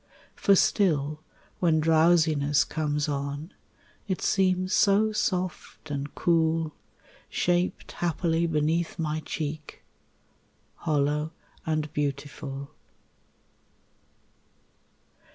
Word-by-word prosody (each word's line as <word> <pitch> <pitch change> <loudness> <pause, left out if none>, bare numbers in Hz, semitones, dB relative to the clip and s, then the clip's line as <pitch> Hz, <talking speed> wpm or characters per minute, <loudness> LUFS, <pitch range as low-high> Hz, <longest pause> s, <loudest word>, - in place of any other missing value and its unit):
For 200 - +4
still 155 -7 +2 0.4
when 165 -3 +3
drowsiness 155 -2 +4
comes 150 -1 -1
on 145 +4 -4 0.5
It 185 -4 -1
seems 185 0 +1
so 210 +2 +4
soft 180 -6 -3
and 140 0 -4
cool, 160 -2 +1 0.6
Shaped 175 +1 0
happily 170 0 0
beneath 160 +2 0
my 155 -2 -1
cheek, 150 -1 -5 0.9
Hollow 150 0 0 0.3
and 155 -2 -1
beautiful. 140 -1 -4
155 Hz, 80 wpm, -27 LUFS, 150-175 Hz, 0.9 s, For